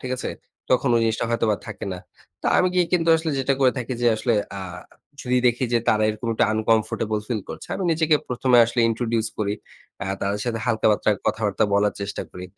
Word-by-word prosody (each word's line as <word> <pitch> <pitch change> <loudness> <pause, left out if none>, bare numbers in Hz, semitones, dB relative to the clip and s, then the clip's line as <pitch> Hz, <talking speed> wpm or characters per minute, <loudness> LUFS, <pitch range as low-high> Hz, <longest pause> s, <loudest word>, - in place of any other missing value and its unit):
ঠিক 130 - -6
আছে? - - -4 0.4
তখন 130 +1 +3
ওই 115 - +4
জিনিসটা 115 +1 0
হয়তোবা 115 -2 +1
থাকে 110 -3 -7
না। 90 - -5 0.4
তো - - -2
আমি 185 - +4
গিয়ে 180 -2 +3
কিন্তু 165 -2 +2
আসলে 160 0 -2
যেটা 135 +1 +1
করে 130 -2 +5
থাকি 125 0 -4
যে - - +3
আসলে 120 +2 0 0.3
আ - - -5 0.6
যদি 125 0 0
দেখি 120 +2 +2
যে 120 - +4
তারা 110 0 +3
এরকম 110 +2 -3
একটা - - +3
আনকমফর্টেবল 110 0 +1
ফিল 115 -4 -1
করছে। - - -8
আমি 190 - -3
নিজেকে 160 -1 +2
প্রথমে 125 0 +2
আসলে 120 +1 -1
introduce 115 -1 -1
করি। 105 -1 0 0.5
আ - - -2 0.2
তাদের 100 +1 -1
সাথে 115 -2 -2
হালকা-পাতলা 110 -1 +2 0.2
কথাবার্তা 105 -3 +1
বলার 105 0 +2
চেষ্টা 100 0 -4
করি। 90 - -8
115 Hz, 200 wpm, -23 LUFS, 110-125 Hz, 0.6 s, করে